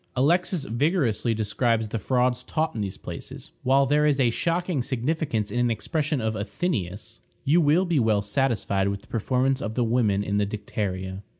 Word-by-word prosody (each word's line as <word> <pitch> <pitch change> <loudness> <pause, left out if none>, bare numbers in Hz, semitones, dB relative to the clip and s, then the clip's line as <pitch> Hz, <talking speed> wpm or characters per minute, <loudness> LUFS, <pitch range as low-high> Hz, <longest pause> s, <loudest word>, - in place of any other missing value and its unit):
Alexis 170 +4 +2
vigorously 125 - +1
describes 110 +1 0
the 115 - -2
frauds 125 +2 +1
taught 160 +3 -1
in 110 - -3
these 95 -2 -4
places, - - -8
while 135 +2 +4
there 150 +2 +3
is 145 -2 +2
a 120 -3 +3
shocking 170 +2 0
significance 125 -3 -1
in 120 - -1
an 120 0 +2
expression 150 +6 -1
of 110 -1 -1
Athenæus 105 - -3 0.2
"You 155 +5 +4
will 160 +5 +3
be 170 -5 +1
well 110 -3 +2
satisfied 105 -4 0
with 100 0 -2
the - - -21
performance 130 +4 0
of 110 0 -4
the 125 - +2
women 110 -4 +2
in 100 0 0
the 100 - +1
dicteria." 95 -2 -4
120 Hz, 180 wpm, -25 LUFS, 105-145 Hz, 0.2 s, while